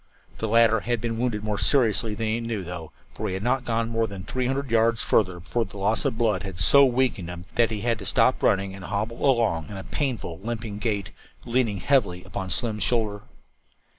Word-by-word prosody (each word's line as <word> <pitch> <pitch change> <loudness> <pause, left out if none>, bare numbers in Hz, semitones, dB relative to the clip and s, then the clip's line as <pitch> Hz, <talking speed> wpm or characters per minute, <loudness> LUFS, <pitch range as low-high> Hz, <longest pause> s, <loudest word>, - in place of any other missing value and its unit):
The 110 - -1
latter 115 0 +4
had 120 +2 -1
been 115 0 -3
wounded 115 -4 -1
more 105 -1 -2
seriously 115 -5 +3
than 115 - -3
he 110 +1 0
knew, 115 -4 -3
though, 85 -2 -7 0.3
and - - -1
he 95 - -2
had 95 - -4
not 125 +2 0
gone 115 -1 0
more 115 -1 0
than 100 -2 -8
three 125 +4 -2
hundred 135 -1 -2
yards 115 -1 +3
further 90 -4 +2
before 115 +7 -1
the 100 0 -11
loss 105 +7 0
of 130 -5 0
blood 110 -6 +1
had 95 -2 -7
so 140 +9 +7
weakened 125 -8 0
him 90 0 -8
that 120 -1 +3
he 110 -2 -4
had 115 -1 0
to 100 - -8
stop - - +3
running 95 0 +2
and 95 0 -9
hobble 110 +3 -3
along 110 - +1
in 100 - -7
a 95 - -6
painful, 120 - -3
limping 110 -1 -5
gait, 105 -3 -2 0.3
leaning 120 -4 +1
heavily 100 -6 +1
upon 95 - -5
Slim's 110 0 -1
shoulder. 105 -1 0
110 Hz, 215 wpm, -25 LUFS, 100-120 Hz, 0.3 s, so